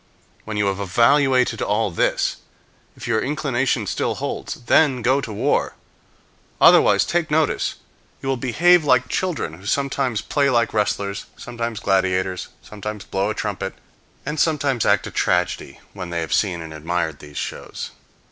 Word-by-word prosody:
When 110 Hz, -1 st, -4 dB
you 105 Hz, -, +2 dB
have 100 Hz, 0 st, -1 dB
evaluated 125 Hz, +4 st, +3 dB
all 105 Hz, -1 st, 0 dB
this, 85 Hz, -, 0 dB, 0.6 s
if 125 Hz, -1 st, -7 dB
your 110 Hz, -2 st, +1 dB
inclination 135 Hz, -3 st, 0 dB
still -, -, -1 dB
holds, -, -, -4 dB
then 130 Hz, -2 st, +3 dB
go 130 Hz, +4 st, +3 dB
to 115 Hz, -, -6 dB
war. 100 Hz, -, 0 dB, 0.8 s
Otherwise, -, -, +6 dB
take 170 Hz, -2 st, 0 dB
notice, 155 Hz, 0 st, +1 dB, 0.4 s
you -, -, -7 dB
will 135 Hz, -, +1 dB
behave 160 Hz, +8 st, +4 dB
like 130 Hz, -3 st, +3 dB
children 175 Hz, -, -2 dB
who 95 Hz, +5 st, -11 dB
sometimes 135 Hz, -4 st, 0 dB
play 140 Hz, -2 st, +1 dB
like 120 Hz, -3 st, +2 dB
wrestlers, 100 Hz, -2 st, -1 dB
sometimes 115 Hz, -2 st, -4 dB
gladiators, 95 Hz, -1 st, 0 dB, 0.2 s
sometimes 105 Hz, 0 st, -7 dB
blow 95 Hz, +2 st, -1 dB
a 110 Hz, -, -2 dB
trumpet, 100 Hz, -2 st, -3 dB, 0.5 s
and 150 Hz, +2 st, -3 dB
sometimes 140 Hz, -7 st, +1 dB
act -, -, +3 dB
a -, -, -6 dB
tragedy -, -, -1 dB
when 90 Hz, -3 st, -6 dB
they 85 Hz, -1 st, -2 dB
have 80 Hz, -, -3 dB
seen 90 Hz, -5 st, +1 dB
and 80 Hz, -1 st, -8 dB
admired 80 Hz, 0 st, -2 dB
these 75 Hz, -1 st, -11 dB
shows. -, -, -5 dB
115 Hz, 155 wpm, -22 LUFS, 95-135 Hz, 0.8 s, Otherwise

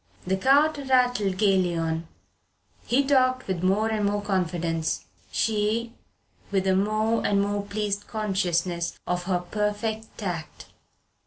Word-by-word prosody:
The 190 Hz, +1 st, +1 dB
cart 285 Hz, +8 st, +4 dB
rattled 245 Hz, -7 st, +2 dB
gaily 185 Hz, -4 st, +2 dB
on 165 Hz, 0 st, -2 dB, 0.8 s
he 260 Hz, +4 st, +3 dB
talked 255 Hz, -2 st, +3 dB
with 185 Hz, -3 st, -2 dB
more 195 Hz, +4 st, +2 dB
and 215 Hz, -1 st, -1 dB
more 205 Hz, 0 st, 0 dB
confidence; 170 Hz, -4 st, -1 dB, 0.3 s
she 220 Hz, +2 st, 0 dB, 0.6 s
with 195 Hz, -2 st, 0 dB
a 190 Hz, -1 st, +3 dB
more 215 Hz, +3 st, +1 dB
and 200 Hz, -, +2 dB
more 205 Hz, 0 st, 0 dB
pleased 205 Hz, 0 st, -3 dB
consciousness 185 Hz, -5 st, -1 dB
of 180 Hz, 0 st, -2 dB
her 185 Hz, -1 st, +1 dB
perfect 210 Hz, +3 st, -3 dB
tact. 175 Hz, -7 st, -5 dB
205 Hz, 130 wpm, -26 LUFS, 185-220 Hz, 0.8 s, cart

